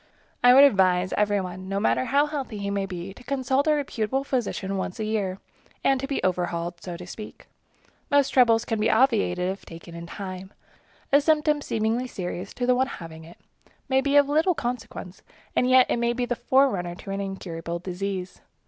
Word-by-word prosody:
I 245 Hz, 0 st, +8 dB
would 275 Hz, -, +9 dB
advise 185 Hz, -7 st, +4 dB
every 205 Hz, -1 st, +2 dB
one, 185 Hz, +1 st, -7 dB
no 195 Hz, 0 st, -1 dB
matter 130 Hz, -, +1 dB
how 285 Hz, +1 st, +3 dB
healthy 280 Hz, -7 st, -5 dB
he 200 Hz, 0 st, -3 dB
may 200 Hz, -1 st, -1 dB
be, 185 Hz, 0 st, -6 dB
to 250 Hz, -, -15 dB
consult 265 Hz, +2 st, 0 dB
a 305 Hz, -, +4 dB
reputable 270 Hz, -2 st, -1 dB
physician 225 Hz, -7 st, -2 dB
once 190 Hz, 0 st, -4 dB
a -, -, -1 dB
year, 205 Hz, -4 st, -1 dB, 0.5 s
and 270 Hz, -1 st, +3 dB
to 270 Hz, -, -3 dB
be 275 Hz, -, -2 dB
overhauled, 175 Hz, -1 st, -1 dB
so 175 Hz, -2 st, -6 dB
to 180 Hz, -, -9 dB
speak. 210 Hz, +4 st, -10 dB, 0.6 s
Most 285 Hz, -1 st, +4 dB
troubles 230 Hz, -3 st, +4 dB
can 225 Hz, -2 st, -2 dB
be 215 Hz, +2 st, +2 dB
obviated 205 Hz, -7 st, +2 dB
if 195 Hz, -, -8 dB
taken 170 Hz, +1 st, -11 dB
in 170 Hz, 0 st, -8 dB
time. 190 Hz, 0 st, -7 dB, 0.6 s
A 285 Hz, +1 st, +6 dB
symptom 300 Hz, -1 st, +2 dB
seemingly 225 Hz, +1 st, -1 dB
serious 180 Hz, -3 st, -5 dB
to 245 Hz, -, -1 dB
the 250 Hz, -, +4 dB
one 260 Hz, +1 st, +2 dB
having 160 Hz, -7 st, -9 dB
it 170 Hz, -, -14 dB, 0.5 s
may 265 Hz, 0 st, +3 dB
be 280 Hz, +1 st, 0 dB
of 285 Hz, -1 st, +6 dB
little 320 Hz, +5 st, +2 dB
consequence, 235 Hz, -7 st, -5 dB, 0.3 s
and 250 Hz, -, +2 dB
yet 255 Hz, 0 st, +7 dB
it -, -, 0 dB
may 235 Hz, 0 st, +1 dB
be 245 Hz, 0 st, -1 dB
the 245 Hz, -, -2 dB
forerunner 235 Hz, -11 st, +2 dB
of 175 Hz, -, -14 dB
an 195 Hz, 0 st, -3 dB
incurable 170 Hz, -4 st, -5 dB
disease. 185 Hz, +1 st, -5 dB
210 Hz, 195 wpm, -25 LUFS, 185-260 Hz, 0.6 s, would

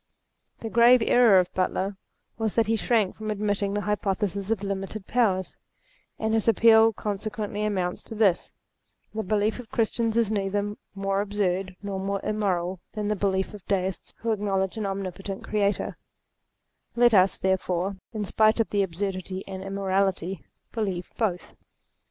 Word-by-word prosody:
The 225 Hz, -, -4 dB
grave 235 Hz, +1 st, +6 dB
error 235 Hz, -5 st, +6 dB
of 180 Hz, -1 st, +2 dB
Butler 190 Hz, +1 st, -1 dB, 0.4 s
was 220 Hz, -2 st, -1 dB
that 230 Hz, -, +4 dB
he 225 Hz, +2 st, +1 dB
shrank 220 Hz, -3 st, +1 dB
from 215 Hz, 0 st, -6 dB
admitting 205 Hz, -1 st, -1 dB
the 205 Hz, -, 0 dB
hypothesis 200 Hz, -1 st, -1 dB
of 220 Hz, -3 st, 0 dB
limited 195 Hz, +1 st, -4 dB
powers; 200 Hz, -7 st, +1 dB, 0.6 s
and 220 Hz, 0 st, -1 dB
his 225 Hz, 0 st, +1 dB
appeal 225 Hz, 0 st, +6 dB
con 210 Hz, -1 st, -3 dB
sequently 210 Hz, 0 st, -4 dB
amounts 185 Hz, -4 st, -1 dB
to 225 Hz, -, -8 dB
this: 200 Hz, -5 st, +2 dB, 0.6 s
The 220 Hz, -, -2 dB
belief 210 Hz, +2 st, 0 dB
of 245 Hz, -, -9 dB
Chris 230 Hz, -5 st, +1 dB
tians 230 Hz, -2 st, -1 dB
is 230 Hz, -3 st, +2 dB
neither 205 Hz, 0 st, -1 dB, 0.2 s
more 195 Hz, 0 st, 0 dB
absurd 195 Hz, -2 st, -1 dB
nor 200 Hz, -1 st, -3 dB
more 195 Hz, +1 st, -1 dB
immoral 190 Hz, -4 st, -1 dB
than 210 Hz, -1 st, -2 dB
the 210 Hz, -, +1 dB
belief 190 Hz, 0 st, 0 dB
of 205 Hz, -3 st, -10 dB
Deists 190 Hz, -2 st, -2 dB
who 230 Hz, -, 0 dB
acknowledge 195 Hz, -2 st, 0 dB
an 215 Hz, -3 st, -2 dB
Omnipotent 195 Hz, 0 st, -5 dB
Creator, 205 Hz, -1 st, -1 dB, 1.0 s
let 240 Hz, -1 st, +5 dB
us, 190 Hz, -1 st, +5 dB
therefore, 190 Hz, 0 st, 0 dB
in 215 Hz, -3 st, -3 dB
spite 215 Hz, +3 st, +3 dB
of 225 Hz, -, +1 dB
the 205 Hz, -, +2 dB
absurdity 190 Hz, 0 st, -3 dB
and 190 Hz, -1 st, -6 dB
immorality, 195 Hz, -3 st, -1 dB, 0.3 s
believe 195 Hz, -6 st, -3 dB
both. 190 Hz, -6 st, -2 dB
200 Hz, 155 wpm, -26 LUFS, 190-215 Hz, 1.0 s, grave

